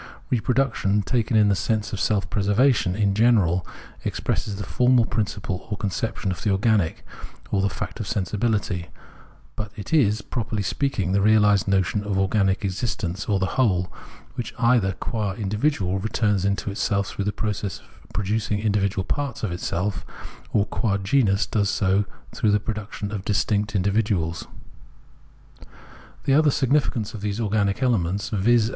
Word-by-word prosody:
Re 125 - +3
production, 110 -5 +1
taken 115 +2 +1
in 105 -1 +5
the 100 - +3
sense 110 +2 -1
of 100 - -2
self 105 -2 +1
preservation 105 -1 +2
in 100 -1 +2
general, 100 -6 +3 0.4
expresses 100 - -2
the 100 - -5
formal 125 0 +3
principle 100 -4 -3
or 105 - -3
conception 100 0 -2
of 90 - -5
the 105 - 0
organic, 100 -3 +1 0.5
or 100 - +2
the 100 - +2
fact - - -6
of 110 - -4
Sensibihty; 105 -4 -1 0.7
but 105 -2 -5
it 105 - -7
is, 110 -8 +3
properly 110 -3 -3
speaking, 100 -6 -1
the 100 - +3
reahsed 105 -1 +4
notion 100 +1 +1
of 105 -2 -2
organic 95 +2 +1
exist 100 +5 -2
ence, 90 +2 -3
or 100 - +3
the 95 - +1 0.2
whole, 95 -6 +1 0.4
which 120 - -5
either 115 -5 +3
qua 105 0 -3
individual 105 -2 0
returns 105 -2 0
into 100 +1 0
itself 100 0 0
through 100 - -4
the 105 - +1
process 105 -3 -3
of - - -22
producing 105 +1 -1
individual 100 -3 0
parts 140 +1 -3
of 105 - -1
itseK, 90 +2 -2 0.5
or 100 - +2
qua 100 -1 0
genus 100 -1 +2
does 100 +2 0
so 100 0 +2 0.3
through 110 - +1
the 105 0 +3
pro 110 +2 -3
duction 105 -1 -6
of 105 -3 -4
distinct 105 +1 0
individuals. 100 -4 0 1.8
The 135 - +2
other 155 +1 +5
significance 135 -5 +1
of 110 - -7
these 105 +1 -2
organic 105 +1 0
elements, 100 -5 +1
viz. 110 +2 +3
105 Hz, 160 wpm, -24 LUFS, 95-110 Hz, 1.8 s, in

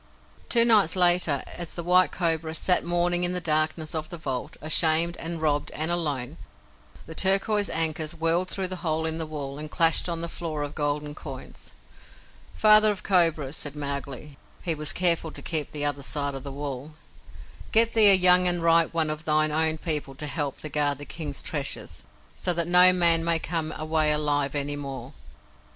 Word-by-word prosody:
Two 235 -1 +6
nights 210 -8 +4
later, 175 -6 +3
as 175 -2 -8
the 170 - -5
White 180 +1 +3
Cobra 165 -2 -2
sat 180 +2 +2
mourning 175 0 0
in 175 0 +1
the 180 - +1
darkness 155 -1 -1
of 155 -1 -4
the 175 - -8
vault, 135 -5 -5
ashamed, 160 +2 +2
and 165 0 -5
robbed, 150 -1 -1
and 160 +2 -1
alone, 150 -4 -2 0.7
the 160 - -10
turquoise 195 +3 +2
ankus 160 0 -2
whirled 165 +3 0
through 195 - -1
the 185 - -5
hole 160 -2 -2
in 160 0 -3
the 160 - -4
wall, 145 -2 -7
and 155 0 -7
clashed 165 +2 +2
on 165 -1 -4
the 170 - -4
floor 160 -3 -4
of 145 0 -6
golden 145 0 -3
coins. 135 -4 -9 0.8
"Father 215 0 +5
of 200 - -7
Cobras," 165 -6 +1
said 145 -2 -6
Mowgli 140 0 -6 0.2
(he 170 - +1
was 150 -1 0
careful 170 -2 +2
to - - -7
keep 155 -3 -1
the 145 -1 -3
other 145 -1 -2
side 140 0 -2
of 135 - -7
the 140 - -8
wall), 140 +1 -7 0.8
"get 230 +1 +3
thee 215 -2 +7
a 195 - +9
young 180 0 +5
and 175 -1 -1
ripe 165 0 +2
one 160 -2 +1
of 155 +1 -6
thine 155 0 +1
own 160 +1 0
people 150 -4 -3
to 150 - -5
help 145 -2 -4
thee 155 - -6
guard 145 -1 -1
the 145 - -10
King's 150 -3 -4
Treasure, 145 -3 -4 0.5
so 180 - -2
that 170 0 -1
no 180 +1 +6
man 170 -2 +3
may 170 0 +1
come 160 -1 -4
away 155 0 0
alive 145 -2 0
any 145 0 -2
more." 135 -2 -8
160 Hz, 190 wpm, -25 LUFS, 145-175 Hz, 0.8 s, a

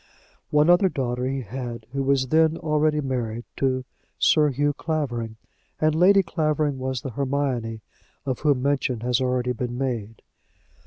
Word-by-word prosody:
One 150 +1 +4
other 175 +2 +5
daughter 125 -4 -2
he 135 0 -2
had, 120 0 -6
who 140 +1 -2
was 135 -1 +1
then 160 0 +3
already 150 -1 +1
married 120 -4 -3
to 130 -1 0 0.3
Sir 150 -2 +4
Hugh 145 +2 0
Clavering, 125 -8 -3 0.4
and 155 0 +3
Lady 190 +4 +5
Clavering 155 -4 0
was 130 -1 -2
the 135 - -5
Hermione 130 -4 -2 0.4
of 130 -2 -2
whom 145 -4 +2
mention 135 -4 0
has 125 +1 +1
already 125 -1 0
been 120 0 -3
made. 115 -5 -3
135 Hz, 150 wpm, -24 LUFS, 125-150 Hz, 0.4 s, other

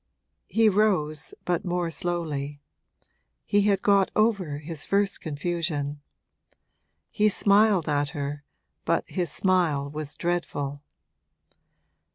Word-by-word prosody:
He 225 0 +3
rose, 185 -8 +1
but 175 -2 0
more 175 -1 -1
slowly; 150 -4 -3 0.9
he 205 - +3
had 195 - +1
got 200 -2 +4
over 200 -9 +1
his 150 0 -6
first 200 0 +1
confusion. 150 -2 -3 1.1
He 215 0 +3
smiled 200 -3 +3
at 145 -1 +1
her, 145 +1 -4 0.4
but - - 0
his 180 -2 -2
smile 165 -7 +1
was 150 -1 -5
dreadful. 145 -5 -2
170 Hz, 105 wpm, -26 LUFS, 145-195 Hz, 1.1 s, got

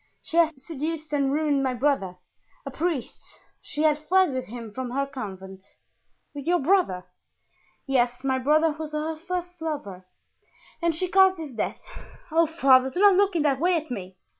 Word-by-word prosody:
"She 330 - -4
had 325 -4 +3
seduced 310 +2 -5
and 280 -2 +1
ruined 295 -1 +1
my 260 -2 0
brother, 240 -9 0 0.5
a 275 - -5
priest. 310 -3 -4 0.2
She 300 - -3
had 305 -1 +3
fled 370 +2 +3
with 255 -1 -3
him 230 -1 -8
from 255 +3 -5
her 275 +3 -1
convent." 190 -8 -8 0.7
"With 285 +1 -8
your 355 +1 +4
brother?" 290 - +1 0.8
"Yes, 245 -2 0
my 265 -1 +1
brother 310 +4 +3
was 305 0 -7
her 310 +1 -2
first 355 +1 -5
lover, 205 - -5 0.7
and 335 -1 +1
she 370 +3 -2
caused 380 0 +5
his 315 -4 -7
death. 230 - -4 0.5
Oh, 330 +1 +4
father, 265 -5 +4
do 350 - -5
not 405 0 +7
look 395 0 +2
in 320 - +2
that 275 -3 +1
way 355 +3 +2
at 315 -4 -3
me! 190 -5 -6
295 Hz, 175 wpm, -25 LUFS, 255-330 Hz, 0.8 s, not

